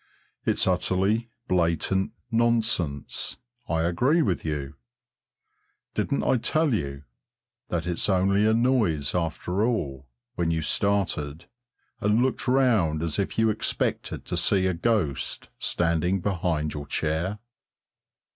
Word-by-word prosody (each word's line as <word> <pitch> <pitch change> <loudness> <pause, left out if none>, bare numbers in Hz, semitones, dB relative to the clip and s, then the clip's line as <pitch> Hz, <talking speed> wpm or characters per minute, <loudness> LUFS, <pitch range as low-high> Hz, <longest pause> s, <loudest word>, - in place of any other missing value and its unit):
It's - - +2
utterly 95 +5 +1 0.2
blatant 90 +2 +1 0.2
nonsense, 110 - 0 0.3
I 80 -1 +1
agree 125 - +2
with 95 -5 -1
you. 75 -3 -3 1.2
Didn't 140 - 0
I 130 - +3
tell 155 +4 +1
you 70 -8 -3 0.7
that 85 -2 -1
it's 90 +3 -1
only 100 +2 +3
a 110 - +4
noise 110 - +2
after 90 +3 -1
all 70 - -2 0.3
when 85 -1 -1
you 80 -1 0
started 85 -5 0 0.5
and 105 +2 +2
looked 130 0 -1
round 110 -12 +3
as 85 +3 -1
if 100 - -2
you 110 -1 +4
expected - - -2
to - - -3
see 95 -2 +3
a 95 - +2
ghost 90 - -1
standing 85 +2 +1
behind 85 -5 -1
your 75 -1 -6
chair? 80 +8 -1
90 Hz, 120 wpm, -26 LUFS, 80-110 Hz, 1.2 s, a